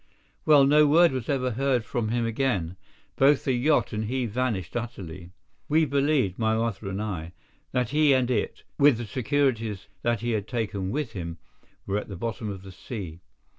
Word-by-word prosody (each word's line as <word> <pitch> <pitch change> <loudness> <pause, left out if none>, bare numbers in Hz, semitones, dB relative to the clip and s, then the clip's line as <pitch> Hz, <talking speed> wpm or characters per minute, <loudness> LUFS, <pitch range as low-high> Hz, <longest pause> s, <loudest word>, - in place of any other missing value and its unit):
Well, 150 -3 +7
no 150 +2 +5
word 165 +3 +6
was 130 -3 -4
ever 130 -3 0
heard 130 -1 0
from 115 0 -2
him 120 +1 0
again. 110 -8 -1 0.4
Both 140 +1 +4
the 130 - +1
yacht 135 +3 +2
and 110 +1 -2
he 125 +3 -1
vanished 110 -6 -2
utterly. 95 -8 -6 0.4
We 160 +2 +4
believed, 140 -8 +1
my 110 -1 +2
mother 110 -3 -2
and 95 +1 -3
I, 90 -6 -4 0.4
that 125 -3 0
he 150 +1 +4
and 130 -2 +2
it, 110 - -2 0.2
with 140 -4 +6
the 120 - -4
securities 115 -3 -1 0.2
that 120 -2 0
he 120 0 -1
had 105 -2 -2
taken 105 -6 -2
with 135 +1 -2
him, 85 -5 -6 0.5
were 100 +1 0
at - - -8
the 100 - -7
bottom 110 +1 -4
of 95 -2 -7
the 95 - -10
sea. 95 -4 -7
115 Hz, 185 wpm, -26 LUFS, 100-135 Hz, 0.5 s, Well